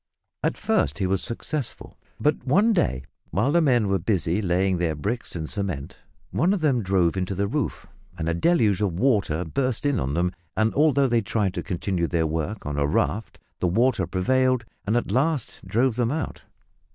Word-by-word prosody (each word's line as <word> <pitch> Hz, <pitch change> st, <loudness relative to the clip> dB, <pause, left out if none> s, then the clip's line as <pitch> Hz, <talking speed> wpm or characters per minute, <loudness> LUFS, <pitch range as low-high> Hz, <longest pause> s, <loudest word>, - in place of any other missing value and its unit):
At -, -, 0 dB
first 70 Hz, +2 st, +1 dB
he 95 Hz, -, 0 dB
was 95 Hz, 0 st, +1 dB
successful, 130 Hz, +3 st, -3 dB, 0.2 s
but 150 Hz, -, +1 dB
one 200 Hz, -, +3 dB
day, 110 Hz, -, +1 dB, 0.3 s
while 110 Hz, -, +1 dB
the 170 Hz, +2 st, +4 dB
men 120 Hz, -8 st, +3 dB
were 95 Hz, -1 st, +1 dB
busy 90 Hz, 0 st, 0 dB
laying 95 Hz, -1 st, +1 dB
their 85 Hz, -3 st, 0 dB
bricks 105 Hz, +11 st, -3 dB
in 80 Hz, -2 st, -3 dB
cement 95 Hz, -6 st, -3 dB, 0.3 s
one 180 Hz, +5 st, +2 dB
of 190 Hz, -, -4 dB
them 135 Hz, -6 st, +2 dB
drove 95 Hz, -4 st, +2 dB
into 95 Hz, +1 st, -2 dB
the 100 Hz, +2 st, 0 dB
roof, 140 Hz, +3 st, -2 dB, 0.3 s
and 80 Hz, -, -3 dB
a 85 Hz, -, +1 dB
deluge 105 Hz, -, +2 dB
of 100 Hz, -4 st, +1 dB
water 100 Hz, -, +1 dB
burst 130 Hz, -, -1 dB
in 145 Hz, -3 st, +2 dB
on 70 Hz, +3 st, -2 dB
them, 90 Hz, +1 st, +1 dB, 0.3 s
and 110 Hz, +1 st, +2 dB
although 140 Hz, -2 st, +3 dB
they 120 Hz, -2 st, +2 dB
tried 100 Hz, -2 st, -1 dB
to -, -, -3 dB
continue 90 Hz, -2 st, -2 dB
their 80 Hz, -1 st, 0 dB
work 80 Hz, +7 st, -3 dB
on 75 Hz, 0 st, -2 dB
a 70 Hz, -, +2 dB
raft 105 Hz, +8 st, -1 dB, 0.2 s
the 90 Hz, -, +1 dB
water 110 Hz, -1 st, +2 dB
prevailed 130 Hz, +6 st, +1 dB, 0.2 s
and 110 Hz, +4 st, +2 dB
at 120 Hz, -, -2 dB
last 140 Hz, +3 st, 0 dB
drove 120 Hz, +1 st, +1 dB
them 120 Hz, -2 st, +1 dB
out. 155 Hz, +4 st, -4 dB
105 Hz, 190 wpm, -24 LUFS, 90-130 Hz, 0.3 s, the